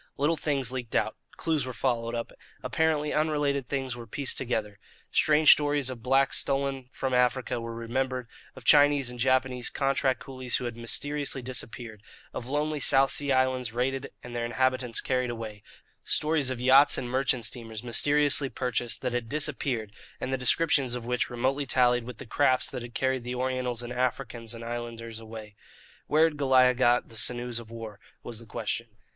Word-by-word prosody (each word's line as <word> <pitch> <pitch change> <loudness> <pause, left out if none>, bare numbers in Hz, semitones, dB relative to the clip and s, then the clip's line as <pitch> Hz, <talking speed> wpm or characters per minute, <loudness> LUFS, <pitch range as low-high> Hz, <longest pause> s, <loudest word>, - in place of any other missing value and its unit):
Little 150 +4 +2
things 140 -5 -1
leaked 125 -3 -5
out, - - +1 0.2
clues 160 -3 0
were 130 - -5
followed 120 -1 -1
up, 115 - -4 0.3
apparently 155 -2 0
unrelated 145 -4 0
things 135 -3 -2
were 120 -1 -9
pieced 135 +4 -2
together. 110 -5 -2 0.3
Strange 150 0 +6
stories 145 -3 +3
of 120 -3 -8
blacks 135 +3 +3
stolen 135 -2 -1
from 130 -1 -3
Africa 125 -1 +1
were 115 0 -6
remembered, 125 +2 -2 0.3
of - - -12
Chinese 145 -3 +5
and 125 - -10
Japanese 130 -1 +1
contract 135 -2 0
coolies 130 -2 -3
who 125 - -5
had 120 -1 -4
mysteriously 140 +3 -1
disappeared, 120 -3 -5 0.3
of 120 - -6
lonely 150 +2 -1
South 135 0 +4
Sea 145 -1 0
Islands 130 -3 +1
raided 135 +3 -1
and 125 -1 -8
their 120 - -1
inhabitants 130 0 0
carried 125 -1 0
away; 110 -3 -6 0.4
stories 150 -3 +2
of 130 -2 -3
yachts 135 +3 +6
and 125 - -3
merchant 130 -1 0
steamers, 115 -3 -4
mysteriously 145 +3 +3
purchased, 125 -2 -2
that 125 -1 -1
had 120 -2 -2
disappeared 135 -7 -1 0.3
and 130 - -3
the - - +3
descriptions 130 0 +2
of 120 -2 -6
which 125 0 -1
remotely 130 +4 -1
tallied 125 -2 +3
with 125 -2 -8
the - - -9
crafts 130 +2 +2
that - - -5
had 120 0 -9
carried 130 -2 0
the 125 +1 -4
Orientals 125 -1 -2
and 120 +1 -6
Africans 120 -2 -2
and 115 - -8
islanders 115 -1 -6
away. 110 -2 -10 0.5
Where 155 +1 +4
had 160 -2 +2
Goliah 130 -2 +5
got 120 -1 +2
the 115 - -11
sinews 120 +1 -1
of 115 -2 -11
war? 110 -3 -8 0.2
was 115 -2 -6
the 115 - -13
question. 115 +1 -3
125 Hz, 175 wpm, -28 LUFS, 120-135 Hz, 0.5 s, Strange